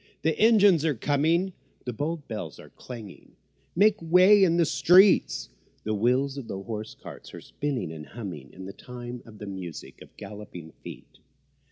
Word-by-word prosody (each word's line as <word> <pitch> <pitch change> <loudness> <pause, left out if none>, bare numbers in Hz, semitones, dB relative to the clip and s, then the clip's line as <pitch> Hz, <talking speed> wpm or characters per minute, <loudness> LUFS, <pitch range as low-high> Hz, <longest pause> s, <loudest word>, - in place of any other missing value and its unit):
the 160 0 +1
engines 205 -7 +5
are 155 -3 +1
coming! 160 - +1 0.3
The 125 - -3
bold 150 +5 -4
bells 105 -9 -6
are - - -14
clanging, 115 -7 -11 0.4
"Make 205 +2 +4
way 185 +5 +6
in 170 -2 +3
the 170 - +4
street!" 185 +5 +4 0.4
The 110 - -2
wheels 125 +6 +1
of 130 -5 -7
the - - -5
hose 110 +2 -6
cart - - -11
are - - -8
spinning 140 - -4
and 75 -1 -9
humming 90 - -8
In 95 - -10
time 125 -1 -8
to 115 - -15
the 105 -1 -10
music 95 -4 -8
of - - -16
galloping 100 -5 -10
feet. - - -11
125 Hz, 165 wpm, -26 LUFS, 105-165 Hz, 0.4 s, way